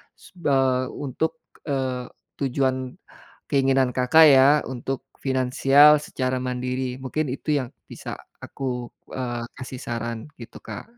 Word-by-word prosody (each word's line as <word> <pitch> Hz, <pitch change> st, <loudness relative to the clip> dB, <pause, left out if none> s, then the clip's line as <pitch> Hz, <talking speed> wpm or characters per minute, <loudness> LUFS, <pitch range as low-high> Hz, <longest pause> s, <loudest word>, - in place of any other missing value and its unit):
su -, -, -18 dB
eee, 130 Hz, -4 st, +2 dB
untuk, 160 Hz, +4 st, -3 dB, 0.3 s
eee, 130 Hz, -3 st, -2 dB, 0.3 s
tujuan 130 Hz, -1 st, -1 dB, 0.6 s
keinginan 135 Hz, -2 st, +3 dB
Kakak 130 Hz, +6 st, +6 dB
ya, 135 Hz, 0 st, +7 dB, 0.2 s
untuk 130 Hz, +1 st, -4 dB
finansial 135 Hz, +3 st, +5 dB
secara 130 Hz, -3 st, -2 dB
mandiri, 125 Hz, 0 st, -3 dB
mungkin 145 Hz, +4 st, -2 dB
itu 150 Hz, +3 st, -1 dB
yang 125 Hz, -, -5 dB, 0.2 s
bisa -, -, -7 dB, 0.3 s
aku, 125 Hz, -3 st, -4 dB, 0.2 s
eee, 120 Hz, -2 st, -3 dB
kasih 130 Hz, -1 st, -7 dB
saran 115 Hz, 0 st, -4 dB
gitu, 115 Hz, -, -10 dB
Kak. -, -, -7 dB
130 Hz, 120 wpm, -24 LUFS, 125-135 Hz, 0.6 s, ya